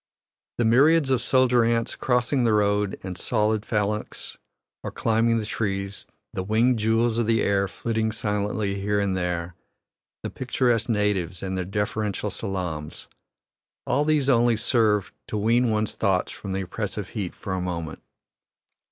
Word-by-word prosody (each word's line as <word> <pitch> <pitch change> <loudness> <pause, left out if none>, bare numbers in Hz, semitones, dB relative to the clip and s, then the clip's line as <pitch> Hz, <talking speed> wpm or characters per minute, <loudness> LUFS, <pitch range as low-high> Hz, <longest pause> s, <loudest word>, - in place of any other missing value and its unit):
The 120 - +1
myriads 140 +5 +4
of 130 -2 +2
soldier 125 -2 +3
ants 115 0 0
crossing 125 +1 +1
the 115 -2 +3
road 105 -1 +1
in 95 -1 -4
solid 105 +2 +1
phalanx 105 -1 -2 0.5
or - - -4
climbing 115 +1 +1
the 110 - -2
trees, 100 -2 -3 0.3
the - - -2
winged 110 +5 +2
jewels 115 +2 +2
of 115 - 0
the 115 0 +2
air 100 -1 +2
flitting 110 +2 -2
silently 105 -1 -2
here 105 +1 +1
and 100 -2 0
there, 90 -1 -2 0.7
the - - -4
picturesque 120 -2 0
natives 105 -5 0
and 95 0 -3
their 90 -1 -2
deferential 105 +1 -2
salaams 85 -6 -4 0.8
all 145 - +2
these 150 -3 +2
only 120 -3 +4
serve 105 -6 +1
to 105 - -3
wean 115 +3 +3
one's 110 -1 0
thoughts 95 -3 0
from 100 - -7
the 95 +1 -1
oppressive 100 +1 -4
heat 100 -6 -4
for 95 - -5
a 95 - -1
moment. 85 -3 -4
105 Hz, 150 wpm, -25 LUFS, 100-115 Hz, 0.8 s, myriads